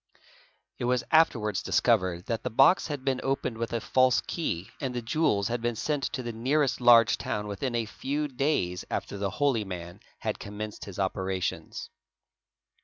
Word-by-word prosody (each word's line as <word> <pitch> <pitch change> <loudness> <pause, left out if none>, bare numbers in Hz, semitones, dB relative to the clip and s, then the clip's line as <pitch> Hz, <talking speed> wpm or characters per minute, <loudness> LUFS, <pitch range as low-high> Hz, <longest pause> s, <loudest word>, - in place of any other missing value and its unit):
It - - -2
was 125 0 +1
afterwards 115 - +3
discovered 95 -7 +1
that 115 -2 -2
the - - -3
box 135 +10 +5
had 145 -4 -5
been 130 -2 +1
opened 135 -4 -1
with 115 - -2
a 115 - 0
false 130 +2 +3
key 95 - -3
and 130 -3 -3
the 120 - -1
jewels 110 -6 +1
had 120 0 -2
been 120 0 -1
sent 145 +4 -1
to 130 - -3
the 120 - -3
nearest 135 +4 +1
large 115 -2 +6
town 105 0 -3
within 110 +5 -3
a 115 -1 0
few 145 +7 -3
days 125 - -1
after - - -3
the 100 0 0
holy 135 -3 +1
man 85 -3 -7 0.2
had - - -3
commenced 105 +1 -6
his 100 -3 -9
operations. 95 -1 -3
115 Hz, 175 wpm, -28 LUFS, 100-135 Hz, 0.2 s, large